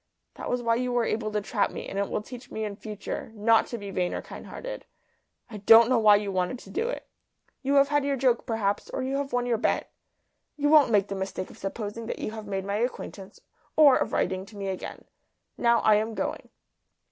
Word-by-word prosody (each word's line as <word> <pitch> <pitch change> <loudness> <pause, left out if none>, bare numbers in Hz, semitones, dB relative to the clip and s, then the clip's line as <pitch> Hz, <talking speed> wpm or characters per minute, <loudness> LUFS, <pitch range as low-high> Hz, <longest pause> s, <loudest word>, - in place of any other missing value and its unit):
That - - -6
was 245 0 -1
why 230 0 +2
you 250 0 -1
were 240 -1 +1
able 215 -1 -1
to 210 0 -1
trap 205 +1 0
me; - - -7
and 195 - -4
it 200 - -1
will 210 - -2
teach 250 +1 -10
me 220 0 -3
in 205 -1 -5
future 215 +1 -6
not 225 +1 +3
to 235 - -5
be 200 -2 -7
vain 180 -1 -1
or - - -3
kind - - -10
hearted. - - -7 0.6
I 225 -4 -8
don't 225 +3 +7
know 255 -2 +4
why 210 -2 +7
you 205 -1 -1
wanted 185 +6 -1
to - - -13
do 460 +4 -1
it. - - -5 0.5
You 280 +1 +1
have 275 0 +5
had 290 -1 +2
your 280 0 0
joke, 250 -2 +1
perhaps, 205 -3 -1
or - - -3
you 270 +1 -1
have 280 -1 -3
won 245 0 0
your 235 -3 0
bet. - - 0 0.7
You 290 0 +1
won't 300 -2 +7
make 205 -3 +2
the - - -2
mistake 190 -1 -4
of - - -15
supposing 210 +3 -5
that - - -4
you - - -4
have 220 -1 -8
made 195 -1 -3
my 200 +1 -1
acquaintance, 210 -4 -5 0.3
or 295 -4 +7
of - - 0
writing 185 0 0
to 205 +1 -13
me 195 -1 -3
again. 190 - -6 0.5
Now, 235 -1 +3
I 215 -1 +5
am 220 +1 -2
going." - - -3
225 Hz, 235 wpm, -27 LUFS, 205-250 Hz, 0.7 s, don't